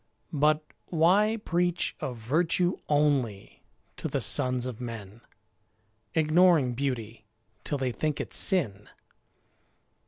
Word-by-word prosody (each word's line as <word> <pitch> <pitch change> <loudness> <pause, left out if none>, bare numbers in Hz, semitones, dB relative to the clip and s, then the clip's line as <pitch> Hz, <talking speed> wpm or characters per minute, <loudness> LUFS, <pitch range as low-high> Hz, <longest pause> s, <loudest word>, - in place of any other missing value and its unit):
But 150 +1 +2 0.2
why 190 +7 +3
preach 175 0 0
Of 125 -2 -4
virtue 165 +9 +1
only 140 -9 0 0.4
to - - -3
the - - -2
sons 125 -1 0
of 125 -2 -6
men, 115 -3 -8 0.9
Ignoring 160 -4 +4
beauty, 115 -5 -4 0.4
till 145 - -2
they 130 -2 -1
think 150 +4 -2
it - - -5
sin? 120 - +2
145 Hz, 105 wpm, -28 LUFS, 120-165 Hz, 0.9 s, Ignoring